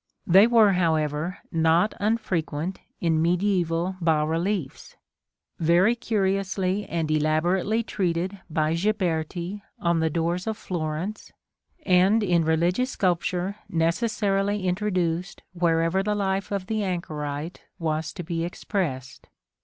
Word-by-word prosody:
They 195 Hz, +5 st, +7 dB
were, 225 Hz, -4 st, +5 dB
however, 160 Hz, -1 st, 0 dB
not 165 Hz, +4 st, +3 dB
unfrequent 185 Hz, -6 st, -1 dB, 0.2 s
in 160 Hz, -2 st, +2 dB
mediæval 175 Hz, 0 st, +1 dB
bas 155 Hz, -2 st, +2 dB
reliefs; 165 Hz, -2 st, -2 dB, 0.6 s
very 175 Hz, +7 st, +4 dB
curiously 195 Hz, -3 st, -1 dB
and 160 Hz, -2 st, -1 dB
elaborately 175 Hz, +8 st, +1 dB
treated 185 Hz, -1 st, -2 dB
by 155 Hz, 0 st, +1 dB
Ghiberti 175 Hz, 0 st, -1 dB, 0.2 s
on 170 Hz, -1 st, +1 dB
the 160 Hz, 0 st, +1 dB
doors 170 Hz, +4 st, -1 dB
of 220 Hz, -1 st, -2 dB
Florence, 170 Hz, +4 st, -4 dB, 0.5 s
and 190 Hz, +4 st, +4 dB
in 175 Hz, -4 st, +2 dB
religious 170 Hz, +10 st, +1 dB
sculpture 185 Hz, -1 st, -1 dB
necessarily 195 Hz, +3 st, 0 dB
introduced 180 Hz, -2 st, -1 dB
wherever 170 Hz, +1 st, +2 dB
the 210 Hz, +1 st, -1 dB
life 195 Hz, -1 st, -1 dB
of 200 Hz, -2 st, -2 dB
the 215 Hz, +1 st, -1 dB
anchorite 155 Hz, -3 st, -4 dB, 0.2 s
was 155 Hz, -1 st, -2 dB
to 180 Hz, -, -6 dB
be 165 Hz, 0 st, -2 dB
expressed. 165 Hz, -, -4 dB
180 Hz, 115 wpm, -25 LUFS, 165-195 Hz, 0.6 s, They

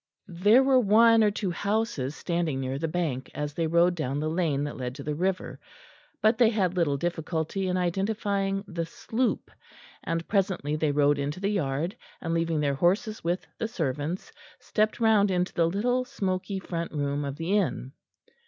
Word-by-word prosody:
There 205 Hz, +9 st, +4 dB
were 265 Hz, -1 st, +5 dB
one 225 Hz, +1 st, +6 dB
or 210 Hz, -, +5 dB
two 200 Hz, -2 st, -2 dB
houses 200 Hz, -, -1 dB
standing 170 Hz, -6 st, -1 dB
near 135 Hz, +1 st, -3 dB
the 165 Hz, -, -1 dB
bank, 155 Hz, -6 st, -2 dB
as 150 Hz, 0 st, -3 dB
they 165 Hz, +1 st, -1 dB
rode 170 Hz, +2 st, +4 dB
down 145 Hz, -4 st, -2 dB
the 155 Hz, +1 st, -1 dB
lane 160 Hz, -5 st, 0 dB
that 145 Hz, -, -4 dB
led 125 Hz, -1 st, -5 dB
to 140 Hz, -, -8 dB
the 150 Hz, -, -2 dB
river, 185 Hz, +4 st, -2 dB, 0.6 s
but 220 Hz, +2 st, +4 dB
they 235 Hz, -3 st, +6 dB
had 190 Hz, -5 st, 0 dB
little 155 Hz, -6 st, +1 dB
difficulty 170 Hz, +3 st, -2 dB
in 180 Hz, 0 st, 0 dB
identifying 195 Hz, +2 st, -1 dB
the 170 Hz, -3 st, -3 dB
"Sloop," 235 Hz, +8 st, -2 dB, 0.5 s
and 165 Hz, 0 st, -2 dB
presently 185 Hz, -7 st, 0 dB
they 155 Hz, -1 st, +1 dB
rode 145 Hz, 0 st, +3 dB
into 145 Hz, +4 st, -3 dB
the 200 Hz, +2 st, 0 dB
yard, 160 Hz, -1 st, -1 dB, 0.2 s
and, 165 Hz, -1 st, -3 dB
leaving 165 Hz, -1 st, 0 dB
their 140 Hz, -1 st, +1 dB
horses 200 Hz, -, +1 dB
with 175 Hz, +2 st, -1 dB
the 225 Hz, -, -1 dB
servants, 160 Hz, -, -3 dB, 0.3 s
stepped 215 Hz, +1 st, 0 dB
round 220 Hz, -3 st, +4 dB
into 180 Hz, -1 st, 0 dB
the 165 Hz, -1 st, +2 dB
little 245 Hz, +7 st, +1 dB
smoky 195 Hz, -6 st, -3 dB
front 170 Hz, -3 st, -4 dB
room 145 Hz, -1 st, -1 dB
of 140 Hz, -1 st, -4 dB
the 165 Hz, +6 st, -1 dB
inn. 175 Hz, -9 st, 0 dB
175 Hz, 180 wpm, -27 LUFS, 150-205 Hz, 0.6 s, one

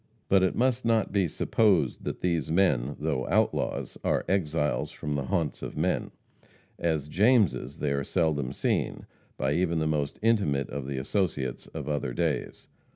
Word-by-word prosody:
But 95 Hz, -1 st, +5 dB
it 95 Hz, -, +2 dB
must 130 Hz, 0 st, +1 dB
not 115 Hz, -2 st, +2 dB
be 100 Hz, -3 st, +2 dB
supposed 90 Hz, -, +1 dB
that -, -, -4 dB
these 85 Hz, -3 st, 0 dB
men, 75 Hz, -7 st, +2 dB
though 75 Hz, -4 st, -1 dB
outlaws, -, -, 0 dB
are -, -, +1 dB
exiles 80 Hz, -6 st, 0 dB
from 75 Hz, -, -5 dB
the 70 Hz, -2 st, -1 dB
haunts 80 Hz, 0 st, -1 dB
of -, -, -6 dB
men. -, -, 0 dB, 0.7 s
As 80 Hz, -4 st, 0 dB
Jameses 85 Hz, -, +2 dB
they 75 Hz, -3 st, -1 dB
are 70 Hz, 0 st, 0 dB
seldom 75 Hz, -6 st, 0 dB
seen, -, -, -1 dB, 0.3 s
by 65 Hz, +2 st, 0 dB
even 85 Hz, 0 st, +1 dB
the 80 Hz, -, 0 dB
most 75 Hz, -2 st, -1 dB
intimate 100 Hz, -12 st, +2 dB
of 70 Hz, 0 st, -4 dB
the 70 Hz, -1 st, -3 dB
associates 70 Hz, -4 st, -2 dB
of -, -, -7 dB
other 75 Hz, -4 st, -2 dB
days. -, -, -2 dB
80 Hz, 160 wpm, -28 LUFS, 70-95 Hz, 0.7 s, But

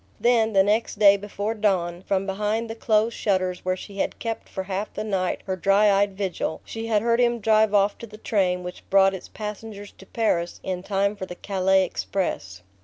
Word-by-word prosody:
Then, 230 Hz, -2 st, +3 dB
the 195 Hz, -1 st, +5 dB
next 215 Hz, +2 st, 0 dB
day 200 Hz, -1 st, +7 dB
before 205 Hz, +2 st, -4 dB
dawn, 185 Hz, -5 st, 0 dB
from 195 Hz, 0 st, -1 dB
behind 210 Hz, +3 st, -2 dB
the -, -, -6 dB
closed 220 Hz, 0 st, +1 dB
shutters 185 Hz, -3 st, -1 dB
where 185 Hz, 0 st, -1 dB
she 200 Hz, +1 st, -10 dB
had -, -, -1 dB
kept 230 Hz, -1 st, -5 dB
for 190 Hz, -, -4 dB
half 195 Hz, +2 st, -4 dB
the -, -, -3 dB
night 190 Hz, -4 st, -1 dB
her 190 Hz, -, -2 dB
dry 195 Hz, +3 st, +4 dB
eyed 200 Hz, 0 st, +1 dB
vigil, 190 Hz, -5 st, -2 dB
she 225 Hz, 0 st, -6 dB
had 215 Hz, -2 st, +1 dB
heard 235 Hz, 0 st, +2 dB
him 240 Hz, -1 st, +2 dB
drive 220 Hz, 0 st, +3 dB
off 200 Hz, 0 st, +2 dB
to 235 Hz, -, -8 dB
the 215 Hz, 0 st, -12 dB
train 185 Hz, -5 st, 0 dB
which 180 Hz, 0 st, -8 dB
brought 195 Hz, 0 st, +5 dB
its 190 Hz, -, -7 dB
passengers 210 Hz, -1 st, -7 dB
to 195 Hz, -, -14 dB
Paris 175 Hz, -7 st, -1 dB
in 185 Hz, -1 st, -3 dB
time 200 Hz, +1 st, 0 dB
for 190 Hz, -2 st, -6 dB
the 180 Hz, -, -8 dB
Calais 190 Hz, 0 st, +2 dB
express. 95 Hz, -, -4 dB
200 Hz, 205 wpm, -24 LUFS, 190-215 Hz, -, day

